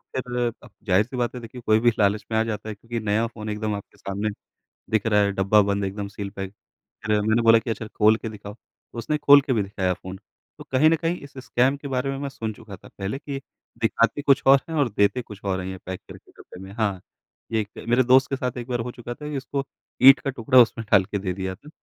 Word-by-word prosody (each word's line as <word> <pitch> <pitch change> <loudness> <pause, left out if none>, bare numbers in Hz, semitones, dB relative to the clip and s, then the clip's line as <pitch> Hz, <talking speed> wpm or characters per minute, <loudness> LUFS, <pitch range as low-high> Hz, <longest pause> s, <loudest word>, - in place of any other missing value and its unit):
फिर 125 -2 -1
क 120 - -14 0.2
ज़ाहिर 95 +3 +4
सी 130 +1 -8
बात 120 +1 -1
है 125 - -6
देखिए 120 +2 -10
कोई 110 0 +5
भी 120 +1 +4
लालच 105 +1 +2
में 110 - +1
आ - - +3
जाता 110 -1 -4
है 105 - -5
क्योंकि 115 +3 -5
नया 105 +3 +2
फ़ोन 110 -2 -8
एकदम 105 0 -2
आपके 100 - -10
सामने 100 +2 -3 0.6
दिख 110 0 +1
रहा 105 -2 +4
है, 100 0 +1
डब्बा 100 +2 +4
बंद 100 0 -1
एकदम 100 +1 -4
सील 100 -1 -6
पैक। 95 -1 -7 0.5
फिर 105 -1 +2
मैंने 110 +3 +2
बोला 115 0 +7
कि 115 +1 -5
अच्छा 110 0 -4
खोल 110 +1 +4
के 115 - -6
दिखाओ, 105 -1 -9
तो 120 - -17
उसने 150 +6 -1
खोल 145 -1 +7
के 135 -1 -2
भी 110 -4 +2
दिखाया 95 -2 -1
फ़ोन। 95 +2 -9 0.4
तो - - -10
कहीं 140 +4 +5
न 165 - +3
कहीं 165 +2 -1
इस 140 - -12
स्कैम 130 +3 +2
के 140 0 -8
बारे 130 +1 -1
में 135 - -4
मैं 140 0 -3
सुन 115 -5 -5
चुका 105 -3 -11
था - - -16
पहले 100 +6 -5
कि 140 -2 -6 0.4
दिखाते 115 +5 +2
कुछ 140 -1 +3
और 135 0 +7
है 165 - -5
और 145 -5 +2
देते 100 +5 +1
कुछ 105 -3 -12
और 95 -1 -1
हैं 90 - -5
ये 95 0 -6
पैक 95 0 -5
करके - - -13
डब्बे 90 - -14
में। 95 - -10
हाँ, 105 -4 -1 0.5
ये 110 -1 +1
क - - -8
मेरे 120 +2 +4
दोस्त 130 +2 +5
के 135 - 0
साथ 125 -2 -3
एक 120 0 -7
बार 120 -2 -1
हो 125 - -4
चुका 120 0 -7
था 150 - -9
उसको 135 +1 -3 0.4
ईंट 135 +1 +9
का 140 - -2
टुकड़ा 130 +1 +3
उसमें 115 -1 +2
डाल 95 - +6
के 100 +1 -3
दे 95 -1 -2
दिया 95 0 -4
था 145 - -17
115 Hz, 260 wpm, -24 LUFS, 100-130 Hz, 0.6 s, ईंट